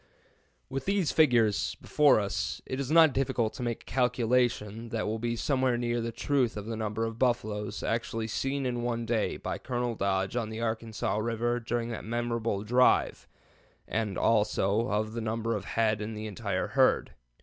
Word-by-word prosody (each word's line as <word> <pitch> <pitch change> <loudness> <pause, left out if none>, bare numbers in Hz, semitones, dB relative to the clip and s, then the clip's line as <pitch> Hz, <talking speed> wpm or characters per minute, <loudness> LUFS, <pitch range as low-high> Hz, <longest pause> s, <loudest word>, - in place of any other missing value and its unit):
With 135 +1 -4
these 195 -5 +1
figures 120 -9 +3
before 145 -6 +4
us, 100 -8 -2
it 130 - -4
is 135 -2 -3
not 160 -2 +6
difficult 130 -4 0
to - - -8
make 120 -2 -3
a - - -38
calculation 120 -3 0
that 115 -1 -2
will 110 +1 -2
be 120 +1 -1
somewhere 130 0 +1
near 120 0 -1
the 115 0 -3
truth 125 -1 0
of 105 - -5
the 115 0 -4
number 110 0 -2
of 115 0 -5
buffaloes 110 -4 -1
actually 115 0 -1
seen 135 +4 -2
in 120 -1 -1
one 120 -1 -2
day 115 -1 0
by - - -4
Colonel 120 -1 -2
Dodge 95 -1 -1
on 115 -3 -1
the 110 0 -6
Arkansas 110 -2 -2
River 120 +2 0
during 120 0 -2
that 115 - -5
memorable 115 -2 -2
drive, 125 +4 +3 0.6
and 105 -3 -2
also 105 0 +2
of 110 +1 -1
the 115 - -3
number 115 +1 -1
of 100 -2 -5
head 110 -2 +1
in 110 +1 -4
the 105 0 -5
entire 100 -3 -2
herd. - - +3
115 Hz, 180 wpm, -29 LUFS, 110-120 Hz, 0.6 s, not